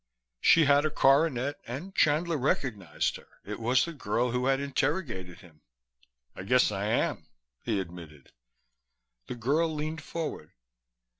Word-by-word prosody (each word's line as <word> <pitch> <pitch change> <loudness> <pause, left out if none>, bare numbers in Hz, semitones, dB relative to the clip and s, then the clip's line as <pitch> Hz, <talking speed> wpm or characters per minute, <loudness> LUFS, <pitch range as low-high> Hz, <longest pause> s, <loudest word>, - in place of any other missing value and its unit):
She 165 - +5
had 145 0 +4
a 155 - +1
coronet, 140 -1 +2
and 145 +11 -6
Chandler 160 +2 +2
recognized 115 - -1
her. - - -21
It 105 +2 -6
was 120 +2 +2
the 170 - -6
girl 120 -2 -1
who 125 +1 0
had 135 0 +2
interrogated 135 - -2
him. 80 -4 -19 0.7
"I - - -7
guess 125 +4 +3
I 100 0 -2
am," 110 +3 -1 0.4
he 110 -4 0
admitted. 85 -6 -9 1.0
The - - -5
girl 145 +8 +1
leaned 155 +1 -4
forward. 155 - -6
130 Hz, 140 wpm, -28 LUFS, 105-150 Hz, 1.0 s, She